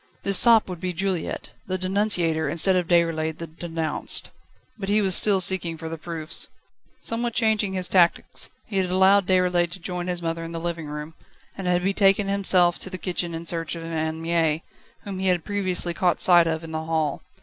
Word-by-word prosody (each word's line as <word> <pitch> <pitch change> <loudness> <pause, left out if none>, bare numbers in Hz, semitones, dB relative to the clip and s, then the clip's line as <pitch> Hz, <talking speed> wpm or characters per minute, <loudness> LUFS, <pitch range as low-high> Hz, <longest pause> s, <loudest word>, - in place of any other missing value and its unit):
This 195 -1 +6
sop 230 -2 +6
would 180 -3 -7
be 180 0 -3
Juliette, 185 -1 -3 0.2
the 185 0 -2
denunciator 185 -4 0
instead 185 +3 +2
of 180 -2 0
Déroulède 165 -2 +1
the 165 - -6
denounced. 165 -1 -1 0.5
But 195 -1 -4
he 210 +1 +3
was 195 -3 +1
still 200 +1 +4
seeking 175 -2 +2
for 160 0 -7
the 165 - -6
proofs. 160 -1 -1 0.5
Somewhat 235 0 -3
changing 215 -4 +1
his 185 -1 0
tactics, 175 -3 +1 0.2
he 205 - -5
had 185 -1 0
allowed 190 +1 +4
Déroulède 180 -2 +2
to 190 - -10
join 180 0 -5
his 175 -1 -3
mother 165 0 -3
in 165 0 -7
the 165 - -4
living 165 -2 -4
room, 150 +2 -7 0.4
and 190 -2 -5
had 180 0 +1
betaken 195 +1 +2
himself 185 -3 +3
to - - -3
the 185 - -6
kitchen 175 -2 -3
in 165 +1 -7
search 165 -1 -3
of 165 - -8
Anne 160 0 -4
Mie, 165 -1 0 0.4
whom 195 -2 -7
he 190 - -1
had 180 -3 +1
previously 185 -4 -1
caught 175 0 0
sight 175 -2 +5
of 160 0 -2
in 165 - -9
the 160 0 -4
hall. 160 -3 -1
175 Hz, 200 wpm, -23 LUFS, 165-190 Hz, 0.5 s, This